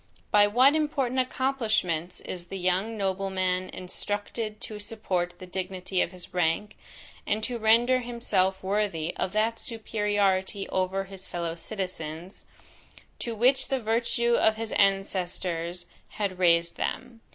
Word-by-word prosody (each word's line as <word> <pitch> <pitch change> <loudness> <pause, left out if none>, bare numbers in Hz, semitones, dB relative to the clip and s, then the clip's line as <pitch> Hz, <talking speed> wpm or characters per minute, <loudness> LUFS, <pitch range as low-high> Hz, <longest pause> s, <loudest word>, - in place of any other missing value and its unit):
By 205 0 +6
what 255 +7 +5
important 275 -5 +1
accomplishments 225 -10 0
is 175 -1 -6
the 195 +2 -6
young 190 +5 0
nobleman 190 -2 0
instructed 205 +3 -4
to 210 -1 -6
support 185 -5 -2
the 185 - -9
dignity 185 0 -2
of - - 0
his 180 -1 -7
rank, 180 +4 0 0.5
and 215 +1 0
to 240 0 -2
render 235 +4 +5
himself 200 -6 0
worthy 190 -5 0
of 185 - -1
that 220 +2 +1
superiority 205 -3 0
over 190 +1 0
his 195 -1 -9
fellow 170 -1 -3
citizens, 170 -1 -5 0.7
to 235 -1 -3
which 255 +5 +3
the 270 -1 0
virtue 235 +1 +1
of 220 -2 +4
his 225 0 -4
ancestors 180 -3 0 0.3
had 200 -3 -2
raised 170 -1 +4
them? 240 -3 -4
195 Hz, 130 wpm, -27 LUFS, 185-225 Hz, 0.7 s, By